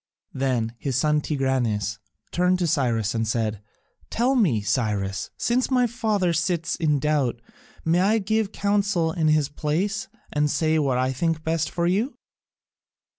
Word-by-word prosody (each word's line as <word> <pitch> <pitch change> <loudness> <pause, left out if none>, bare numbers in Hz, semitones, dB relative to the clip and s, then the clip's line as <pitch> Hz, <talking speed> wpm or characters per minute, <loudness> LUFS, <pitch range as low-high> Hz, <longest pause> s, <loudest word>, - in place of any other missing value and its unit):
Then 125 -4 -1
his 135 -3 -2
son 150 +3 +2
Tigranes 125 -8 -1 0.3
turned 180 +1 +2
to 180 - 0
Cyrus 120 -9 +1
and 115 -1 -1
said, 110 -2 -1 0.5
"Tell 245 +4 +1
me, 175 - +2
Cyrus, 105 -3 -1
since 245 +2 +1
my 250 -2 +3
father 215 -7 0
sits 165 0 0
in 155 -4 +1
doubt, 140 -4 0 0.5
may 165 +2 +3
I 205 +4 +3
give 220 0 0
counsel 200 -6 +1
in 160 -1 0
his 155 -2 +3
place 165 +9 -2 0.3
and 150 0 +2
say 160 +1 +1
what 135 -4 +1
I 130 +1 +1
think 160 +3 -1
best 160 -1 0
for 170 - -1
you?" 205 +10 0
155 Hz, 150 wpm, -24 LUFS, 130-185 Hz, 0.5 s, my